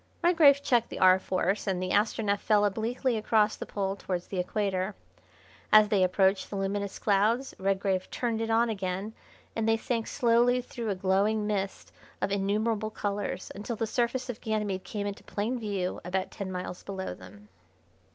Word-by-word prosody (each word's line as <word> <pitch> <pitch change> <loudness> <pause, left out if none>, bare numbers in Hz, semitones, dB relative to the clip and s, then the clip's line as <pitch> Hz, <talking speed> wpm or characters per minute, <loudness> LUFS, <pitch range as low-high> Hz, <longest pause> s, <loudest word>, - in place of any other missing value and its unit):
Redgrave 305 -5 +6
checked 240 -4 +2
the - - -6
R. 185 0 +6
Force 190 +2 -1
and 190 -2 0
the 185 0 -2
Astronef 205 -1 +1
fell 210 -1 +3
obliquely 230 +4 0
across 215 0 +2
the - - -7
pole 195 -1 -2
towards 180 -3 -4
the 190 - -4
equator. 195 +1 -1 0.8
As 215 -1 +7
they 205 -2 +3
approached 190 +1 +2
the - - -5
luminous 200 0 -2
clouds 220 +6 +1
Redgrave 190 -1 0
turned 230 -2 -2
it 225 - -2
on 230 +1 +3
again, 195 0 -3 0.4
and 225 0 0
they 225 - +4
sank 230 -1 -2
slowly 240 +1 +3
through 240 -2 -5
a 200 - 0
glowing 195 +3 +1
mist 195 -2 -3 0.3
of 195 - -1
innumerable 210 +2 0
colours, 205 -3 -3
until 210 +4 -5
the 225 - -1
surface 245 +3 -1
of 245 -3 -6
Ganymede 210 -4 -2
came 205 -2 -4
into 200 -1 -5
plain 230 +5 -2
view 200 -5 -3
about 185 +2 -2
ten 195 -2 -5
miles 180 0 -5
below 190 -1 -5
them. 210 0 -14
205 Hz, 170 wpm, -29 LUFS, 195-225 Hz, 0.8 s, As